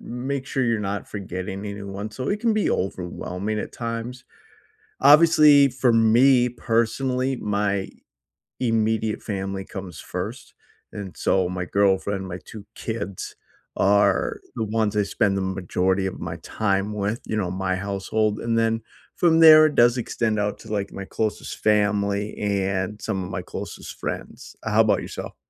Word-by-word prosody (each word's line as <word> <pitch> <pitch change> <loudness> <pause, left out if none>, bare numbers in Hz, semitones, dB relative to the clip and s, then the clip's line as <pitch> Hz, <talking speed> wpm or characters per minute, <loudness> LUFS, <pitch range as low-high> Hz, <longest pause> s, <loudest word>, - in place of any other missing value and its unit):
make 130 +3 -4
sure 135 -2 0
you're 115 -2 +1
not 100 0 -3
forgetting 95 0 -5
anyone. 100 0 -6
So, 125 +4 -5
it 205 +1 -1
can 230 -2 +2
be 215 - +1
overwhelming 95 +2 -3
at - - -4
times. 115 +2 -5 0.8
Obviously, 150 -1 +7
for 125 -1 +1
me, 120 +3 +5
personally, 125 +3 0
my 100 -2 -1 0.7
immediate 110 -2 0
family 95 -2 -4
comes 95 -4 -8
first. - - -6 0.4
And 100 -3 -7
so, 95 -2 +1
my 90 0 -3
girlfriend, 95 0 +1
my 90 0 -6
2 105 -2 -10
kids, 100 -5 -5 0.4
are 100 -1 +3 0.2
the 115 - -1
ones 110 -1 0
I 105 - +3
spend 100 -1 0
the - - -1
majority 95 0 0
of 95 - -4
my 85 -1 -5
time 100 +3 -1
with, 105 +3 -2
you - - -3
know, 90 -4 -1
my 95 0 -1
household. 100 +2 -1
And 115 0 -1
then 115 0 +1 0.4
from 165 -2 +4
there, 155 -1 +10
it 155 - 0
does 120 +1 +5
extend 110 -2 -1
out 105 0 -1
to, 110 - -11
like, 100 -2 -2
my 100 - -6
closest 110 +2 -3
family 105 -1 +1
and 100 0 -1
some 100 -4 -2
of 90 - -7
my 85 - -3
closest - - -8
friends. - - -6
Uh, - - -3
how - - +5
'bout - - +2
yourself? - - -7
105 Hz, 160 wpm, -24 LUFS, 95-115 Hz, 0.8 s, there